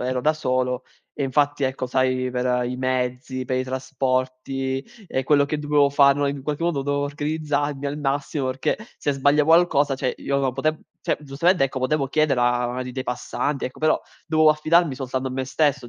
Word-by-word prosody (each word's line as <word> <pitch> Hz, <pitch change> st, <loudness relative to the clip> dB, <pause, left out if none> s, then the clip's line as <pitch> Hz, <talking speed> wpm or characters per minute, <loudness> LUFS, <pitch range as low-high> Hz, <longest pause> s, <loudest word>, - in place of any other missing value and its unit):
ero 125 Hz, 0 st, -1 dB
da 155 Hz, +4 st, +3 dB
solo 130 Hz, -3 st, -1 dB, 0.3 s
e -, -, -4 dB
infatti 145 Hz, +2 st, +1 dB
ecco 130 Hz, -1 st, -1 dB
sai, 130 Hz, 0 st, 0 dB
per 125 Hz, 0 st, 0 dB
i 125 Hz, +1 st, -3 dB
mezzi, 130 Hz, 0 st, -2 dB
per 130 Hz, 0 st, -1 dB
i -, -, 0 dB
trasporti, 130 Hz, +1 st, -2 dB, 0.2 s
ehm, 130 Hz, -, -1 dB
quello 145 Hz, +1 st, +4 dB
che 150 Hz, +2 st, -2 dB
dovevo 145 Hz, -1 st, +3 dB
fare, 140 Hz, 0 st, +4 dB
no, 145 Hz, -, +1 dB
in 140 Hz, -1 st, -3 dB
qualche 150 Hz, +3 st, -2 dB
modo 165 Hz, -5 st, 0 dB
dovevo 145 Hz, +1 st, 0 dB
organizzarmi 145 Hz, -1 st, -2 dB
al 140 Hz, +1 st, -3 dB
massimo, 140 Hz, -1 st, -1 dB
perché 130 Hz, +1 st, -1 dB, 0.2 s
se 145 Hz, -, -1 dB
sbaglio 145 Hz, +2 st, +3 dB
qualcosa, 155 Hz, -3 st, +4 dB
cioè 130 Hz, -1 st, -1 dB
io 140 Hz, 0 st, -1 dB
non 135 Hz, -2 st, 0 dB
pote 155 Hz, +4 st, -1 dB, 0.2 s
cioè, -, -, 0 dB
giustamente 150 Hz, +5 st, +1 dB
ecco 135 Hz, -1 st, 0 dB
potevo 135 Hz, +2 st, 0 dB
chiedere 150 Hz, -3 st, +2 dB
a 120 Hz, 0 st, +2 dB
una 125 Hz, +1 st, -3 dB
di 125 Hz, -, -6 dB
dei 130 Hz, +1 st, -4 dB
passanti, 130 Hz, +3 st, -2 dB
ecco, 130 Hz, -, -10 dB
però 155 Hz, 0 st, +2 dB, 0.3 s
dovevo 155 Hz, -1 st, +4 dB
affidarmi 155 Hz, -1 st, +2 dB
soltanto 130 Hz, 0 st, -3 dB
a -, -, -7 dB
me 130 Hz, +1 st, -2 dB
stesso 140 Hz, -1 st, 0 dB
135 Hz, 195 wpm, -23 LUFS, 130-145 Hz, 0.3 s, quello